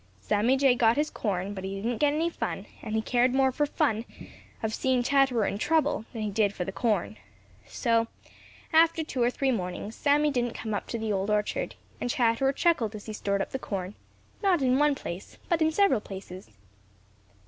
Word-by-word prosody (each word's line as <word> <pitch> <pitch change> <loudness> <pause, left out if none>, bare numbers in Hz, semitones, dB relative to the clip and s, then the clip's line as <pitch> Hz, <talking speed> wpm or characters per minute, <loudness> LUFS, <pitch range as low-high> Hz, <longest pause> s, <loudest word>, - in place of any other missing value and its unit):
Sammy 210 - +2
Jay 270 -2 +5
got 235 0 +3
his 300 +1 0
corn, 195 -2 -2
but 190 -2 -7
he 195 +1 -4
didn't 230 +2 -2
get 295 -1 +4
any 325 +3 0
fun, - - -4 0.2
and 215 - -4
he 220 - 0
cared 245 +2 +2
more 265 -1 +4
for 295 +3 0
the - - -23
fun 220 +1 +1 0.6
of 220 0 -1
seeing 255 0 +1
Chatterer 265 -4 +3
in 200 - -2
trouble 310 -6 +1
than 225 -2 -4
he 210 - -2
did 205 -1 +2
for 180 - -3
the 195 - -4
corn. 195 - -1 0.5
So, 230 -1 +1 0.7
after 325 0 +5
two 265 -4 -4
or 240 - +4
three 265 +1 0
mornings, 195 0 -3
Sammy 295 +2 +2
didn't 240 -3 -1
come 220 -2 -4
up 205 - -3
to 235 - -3
the 220 -2 -2
Old 195 +1 -1
Orchard, 210 0 -1 0.2
and 245 - -2
Chatterer 240 +2 +2
chuckled 270 - +1
as 205 - -9
he 215 - -6
stored 200 -1 -1
up - - -10
the 265 - -3
corn, 195 -5 -4 0.5
not 370 -8 +3
in 255 +1 +3
one 295 -1 +4
place, 180 -7 -7
but 335 -2 +2
in 315 0 +4
several 320 - +3
places. 190 - -9
235 Hz, 205 wpm, -28 LUFS, 205-275 Hz, 0.7 s, Jay